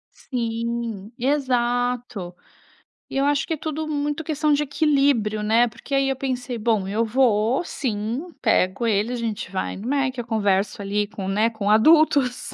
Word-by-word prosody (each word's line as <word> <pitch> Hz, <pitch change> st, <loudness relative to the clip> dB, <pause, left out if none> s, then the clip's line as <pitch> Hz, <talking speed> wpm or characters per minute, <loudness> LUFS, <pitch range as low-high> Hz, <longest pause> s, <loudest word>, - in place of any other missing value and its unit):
Sim, 230 Hz, -3 st, -4 dB
exato. 245 Hz, -7 st, -1 dB, 0.7 s
E -, -, -4 dB
eu 275 Hz, -, +2 dB
acho 285 Hz, -1 st, +1 dB
que 320 Hz, -, -1 dB
tudo 310 Hz, +1 st, -4 dB
muito 295 Hz, +1 st, -2 dB
questão 305 Hz, -1 st, 0 dB
de 290 Hz, +1 st, +2 dB
equilíbrio, 275 Hz, -7 st, +1 dB
né? 230 Hz, +3 st, +4 dB
Porque 235 Hz, +5 st, -9 dB
aí 275 Hz, 0 st, +2 dB
eu 270 Hz, -, 0 dB
pensei: 255 Hz, -2 st, -3 dB
"Bom, 215 Hz, -4 st, 0 dB
eu 220 Hz, +3 st, 0 dB
vou, 235 Hz, +2 st, +2 dB
sim, 250 Hz, +4 st, -3 dB
pego 195 Hz, -1 st, +2 dB
ele, 215 Hz, +3 st, +1 dB
a -, -, -1 dB
gente 225 Hz, -5 st, -4 dB
vai 190 Hz, -, -3 dB
no 210 Hz, +5 st, -7 dB
Méqui, 270 Hz, -2 st, 0 dB
eu 240 Hz, -, -4 dB
converso, 205 Hz, -2 st, 0 dB
ali, 205 Hz, +1 st, -1 dB
com 200 Hz, -2 st, -6 dB
né, 210 Hz, +4 st, +2 dB
com 220 Hz, -3 st, -3 dB
adultos, 270 Hz, +2 st, +4 dB
240 Hz, 165 wpm, -23 LUFS, 215-275 Hz, 0.7 s, né